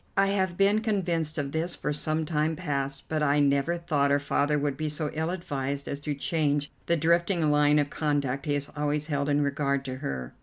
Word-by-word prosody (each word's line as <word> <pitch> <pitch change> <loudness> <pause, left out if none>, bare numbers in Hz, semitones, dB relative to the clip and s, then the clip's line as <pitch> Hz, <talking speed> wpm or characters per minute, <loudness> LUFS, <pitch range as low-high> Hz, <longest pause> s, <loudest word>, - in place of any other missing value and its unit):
I 195 0 +4
have 190 -3 0
been 200 +2 +3
convinced 175 -8 -1
of 140 -2 -2
this 165 +3 -2
for 150 - -2
some 155 +2 -1
time 155 0 0
past, 140 -5 -2
but 155 -1 -1
I 145 0 +3
never 140 +4 +2
thought 150 -4 +1
her 140 - +4
father 145 +1 +1
would 145 -1 -1
be 155 +2 -2
so 150 0 -2
ill 160 +1 -1
advised 140 -6 -3
as 140 - -3
to 145 0 -3
change 145 -1 0 0.2
the 170 - +3
drifting 170 0 +2
line 150 0 +4
of 145 -1 +1
conduct 140 -2 -1
he 145 - +2
has 145 0 -3
always 150 0 0
held 140 0 0
in 145 0 +2
regard 140 -1 0
to 130 -1 -4
her." 65 - -5
150 Hz, 215 wpm, -27 LUFS, 140-160 Hz, 0.2 s, I